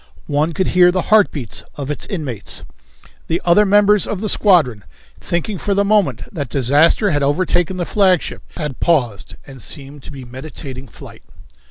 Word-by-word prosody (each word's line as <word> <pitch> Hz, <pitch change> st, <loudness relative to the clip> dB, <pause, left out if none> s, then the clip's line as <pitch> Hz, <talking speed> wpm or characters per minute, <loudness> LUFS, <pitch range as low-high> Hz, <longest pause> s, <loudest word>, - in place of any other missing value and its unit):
One 150 Hz, +3 st, 0 dB
could 185 Hz, +3 st, -1 dB
hear 180 Hz, 0 st, +5 dB
the 185 Hz, 0 st, -2 dB
heartbeats 155 Hz, -, +2 dB
of 140 Hz, 0 st, -4 dB
its 150 Hz, -, -5 dB
inmates. 140 Hz, -, -5 dB, 0.6 s
The 165 Hz, -, 0 dB
other 200 Hz, +4 st, +5 dB
members 205 Hz, 0 st, +4 dB
of 205 Hz, -, -3 dB
the 215 Hz, +1 st, -2 dB
squadron, 155 Hz, -, +2 dB, 0.4 s
thinking 175 Hz, +3 st, -3 dB
for 200 Hz, -1 st, -1 dB
the 200 Hz, +1 st, +2 dB
moment 205 Hz, -2 st, +1 dB
that 145 Hz, -, -5 dB
disaster 145 Hz, -, +3 dB
had 145 Hz, -2 st, 0 dB
overtaken 175 Hz, +5 st, 0 dB
the 175 Hz, -, -2 dB
flagship, 190 Hz, -4 st, +1 dB, 0.2 s
had 150 Hz, -6 st, -5 dB
paused 125 Hz, -12 st, 0 dB
and 135 Hz, -3 st, -11 dB
seemed 140 Hz, +2 st, -5 dB
to -, -, -11 dB
be 135 Hz, -3 st, -9 dB
meditating 130 Hz, +1 st, -9 dB
flight. -, -, -13 dB
165 Hz, 165 wpm, -18 LUFS, 140-190 Hz, 0.6 s, hear